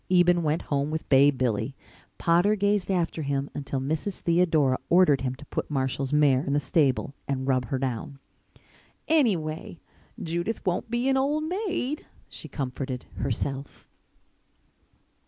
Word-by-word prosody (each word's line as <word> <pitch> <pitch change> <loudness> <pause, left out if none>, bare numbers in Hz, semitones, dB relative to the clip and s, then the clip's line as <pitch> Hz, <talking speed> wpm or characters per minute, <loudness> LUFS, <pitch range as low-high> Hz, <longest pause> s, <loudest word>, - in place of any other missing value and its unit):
Eben 175 -1 +4
went 155 0 0
home 140 0 -1
with 160 0 -4
Bay 140 +1 +7
Billy. 130 -1 -1 0.4
Potter 175 +5 +3
gazed 205 -1 +1
after 170 -3 0
him 140 -1 -2
until 140 -1 -3
Mrs. 155 +8 -2
Theodora 160 -6 +3
ordered 170 -6 +5
him 130 -1 -2
to 145 +3 -13
put - - -4
Marshall's 135 -1 -1
mare 145 -3 +4
in 140 - -1
the 145 - +3
stable 140 -3 +1
and 135 -1 -2
rub 130 -2 +2
her 130 +3 -2
down. 130 +1 -3 0.9
"Anyway, 175 - +1 0.4
Judith 170 +7 -3
won't 180 +6 -1
be 240 +2 0
an 265 0 +3
old 290 +3 +1
maid," 350 - -2 0.2
she - - -7
comforted 130 -2 -4
herself. 135 +3 -3
150 Hz, 140 wpm, -26 LUFS, 135-180 Hz, 0.9 s, Bay